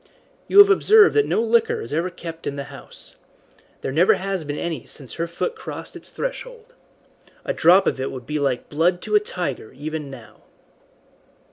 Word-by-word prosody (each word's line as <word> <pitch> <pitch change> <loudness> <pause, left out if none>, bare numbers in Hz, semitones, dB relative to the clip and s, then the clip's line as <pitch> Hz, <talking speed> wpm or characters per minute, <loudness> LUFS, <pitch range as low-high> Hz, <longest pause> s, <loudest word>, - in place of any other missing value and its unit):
You - - +1
have 405 0 +10
observed 425 +2 +6
that 430 - +3
no 225 - +1
liquor 230 0 +2
is 115 - -7
ever 170 +4 0
kept 165 -2 -8
in 140 - -3
the 140 - -4
house. - - -9 0.6
There - - -3
never 165 +7 +4
has 195 -2 -3
been 145 0 -5
any 165 -7 -4
since 135 -4 -8
her 170 0 -3
foot 175 - -3
crossed - - -8
its - - -7
threshold. - - -6 0.7
A - - -1
drop 185 +4 +5
of 130 - 0
it 135 - -2
would 125 -2 -8
be 150 +3 -2
like 135 -4 -1
blood 175 +4 +1
to - - -5
a 420 - +7
tiger 430 -1 -5
even 155 -1 -5
now." 110 -5 -13
170 Hz, 190 wpm, -22 LUFS, -, 0.7 s, have